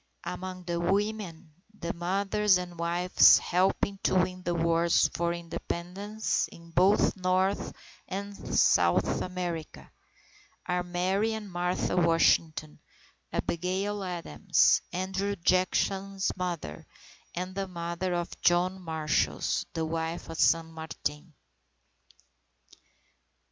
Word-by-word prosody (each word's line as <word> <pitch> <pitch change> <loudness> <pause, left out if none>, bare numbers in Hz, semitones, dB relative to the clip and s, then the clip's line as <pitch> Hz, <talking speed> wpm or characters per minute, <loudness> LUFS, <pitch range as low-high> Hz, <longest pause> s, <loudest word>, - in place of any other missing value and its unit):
Among 185 0 -6
the 170 -1 -2
women, 190 -3 -1 0.3
the 170 - -3
mothers 195 +3 +2
and 175 -2 -7
wives 175 +2 +5
helping 190 +2 0
to - - +1
win 185 0 +1
the 175 -1 -2
Wars 170 0 +3
for 170 0 0
Independence 180 +5 -3
in 170 0 -14
both 190 +6 +4
North 185 +1 0 0.4
and 200 +1 -5
South - - +2
America, 175 -3 -5 0.7
are 180 0 0
Mary 185 +5 0
and 210 -3 -6
Martha 180 +1 -1
Washington, 165 -2 +2 0.5
Abigail 190 +4 -2
Adams, 175 - +2
Andrew 190 +2 -2
Jackson's 190 +2 +1
mother, 170 - -5 0.5
the 185 +2 -3
mother 170 0 -3
of 175 0 -4
John 180 +2 +2
Marshall, 160 -3 0
and - - -1
the 160 -1 -1
wife 165 +1 -3
of 165 - -6
San 165 -1 +3
Martin. 160 -1 -6
180 Hz, 105 wpm, -29 LUFS, 170-190 Hz, 0.7 s, wives